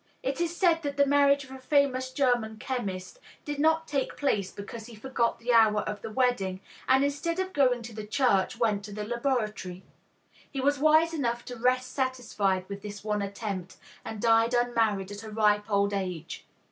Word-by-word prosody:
It 270 +5 -2
is 340 0 -1
said 335 -3 +3
that 285 -2 -4
the 280 - +5
marriage 280 0 +4
of 265 - -14
a 265 - -8
famous 260 -1 +1
German 245 -5 +1
chemist 215 - -4 0.3
did 290 -1 -4
not 320 +2 +2
take 275 -3 -2
place 205 -9 0
because 215 +2 -8
he 235 - -11
forgot 235 +1 -1
the 240 +1 -1
hour 215 -2 +5
of 210 -1 -5
the - - -6
wedding, 215 -6 0 0.3
and 265 +1 +5
instead 290 +4 -1
of 375 0 -2
going 250 -5 +2
to 230 0 -8
the 215 -1 -7
church 225 -3 +2
went 215 -4 +1
to 210 - -9
the 210 +1 -5
laboratory. 215 -7 -2 0.7
He 275 - -5
was 285 +1 +2
wise 315 +2 +4
enough 240 -6 -2
to 245 - -7
rest 255 +1 +1
satisfied 220 -8 -1
with 200 0 -7
this 205 -1 -8
one 210 -1 -1
attempt, 200 -2 -5 0.3
and 220 -1 -6
died 230 +2 +3
unmarried 225 -5 +1
at 205 0 -7
a 220 - -8
ripe 210 -1 +2
old 200 0 +2
age. 180 -5 -4
235 Hz, 190 wpm, -28 LUFS, 210-275 Hz, 0.7 s, the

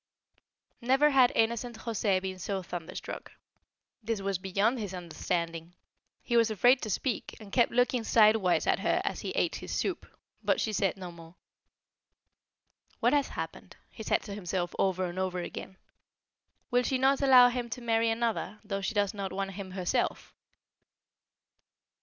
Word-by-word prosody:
Never 270 +5 +4
had 260 -3 +5
innocent 235 +1 0
José 215 -4 0
been 185 0 -5
so 190 +1 -3
thunderstruck. 175 -2 -7 0.7
This 225 -1 -2
was 195 -2 -2
beyond 200 +6 +1
his 200 -4 -4
understanding. 170 -1 -4 0.5
He 240 - -1
was 230 -1 +5
afraid 245 +5 +4
to 215 - -4
speak, 230 +3 -2
and 210 -3 -12
kept 240 - +3
looking 245 0 +2
sidewise 215 -5 +4
at - - +2
her - - +1
as - - -2
he - - -4
ate - - +1
his - - -8
soup; 360 - -2 0.4
but - - +2
she 220 - -1
said 195 -1 0
no 180 -2 -7
more. 165 0 -14 1.6
"What 240 +4 +3
has 285 -2 +3
happened?" - - -7
he - - -10
said - - 0
to 205 - -7
himself 180 -3 -3
over 185 -1 +1
and 175 +1 -5
over 185 -1 -1
again. 185 +2 -7 0.9
"Will 245 0 +4
she 260 +1 0
not 270 +2 +3
allow 255 -3 +8
him 245 -1 -3
to 240 - -5
marry 230 -1 +1
another, 225 -2 -1
though 200 -2 -3
she 195 +3 -3
does 205 0 +1
not 195 -2 -4
want 195 0 -3
him 195 0 -7
herself?" 185 -1 -2
210 Hz, 160 wpm, -29 LUFS, 185-235 Hz, 1.6 s, allow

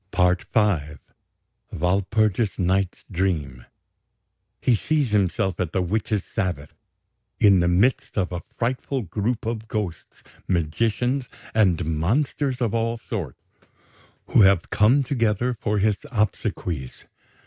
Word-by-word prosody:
"PART 90 -1 +1
V 85 -9 +1 0.7
"WALPURGIS 100 +4 +1
NIGHT'S 95 +1 0
DREAM 80 -9 -2 0.9
"He 125 - +2
sees 140 +2 0
himself 95 -2 +1
at 90 -3 -2
the 95 - +1
witches' 105 +1 -1
Sabbath, 85 -6 -3 0.7
in 100 -3 +6
the 85 - +2
midst 100 +10 +1
of 95 -2 0
a 90 -1 -4 0.2
frightful 125 +2 -1
group 105 +6 -2
of 110 -1 -3
ghosts, 105 -7 -5 0.2
magicians, 115 - 0 0.2
and 90 -6 +3
monsters 125 - 0
of 115 -4 0
all 115 0 0
sorts, 115 - -6 0.9
who - - +5
have 95 -3 +4
come 125 +7 +4
together 120 -2 0
for 105 0 0
his 105 0 +2
obsequies. 90 - -2
100 Hz, 115 wpm, -24 LUFS, 90-115 Hz, 0.9 s, in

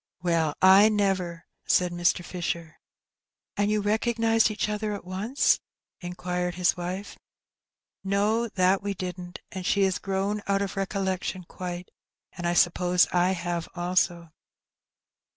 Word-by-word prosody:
"WeU, 165 -4 +1
I 195 +3 +8
never!" 190 -5 -1 0.2
said 180 -1 +3
Mr. 175 0 +1
Fisher. 170 -3 -4 0.8
"And 205 0 +1
you 210 0 +1
recognized 225 +1 +2
each 215 0 -2
other 210 0 -2
at 200 - -9
once?" 200 +9 +1 0.4
inquired 180 0 -3
his 180 -1 +2
wife. 185 +3 -6 0.4
" - - -66
No, 205 +4 +1
that 190 -1 +2
we 200 0 -3
didn't: 180 -1 -6 0.2
she 195 +2 +2
has 190 -1 +1
grown 195 +2 -2
out 200 0 +1
of 195 - -5
recollection 190 -1 -2
quite; 180 0 -7 0.4
and 175 -1 -4
I 175 - 0
suppose 180 +1 +4
I 180 +1 +3
have 175 -2 -3
also." 175 -1 0
185 Hz, 135 wpm, -26 LUFS, 175-200 Hz, 0.8 s, I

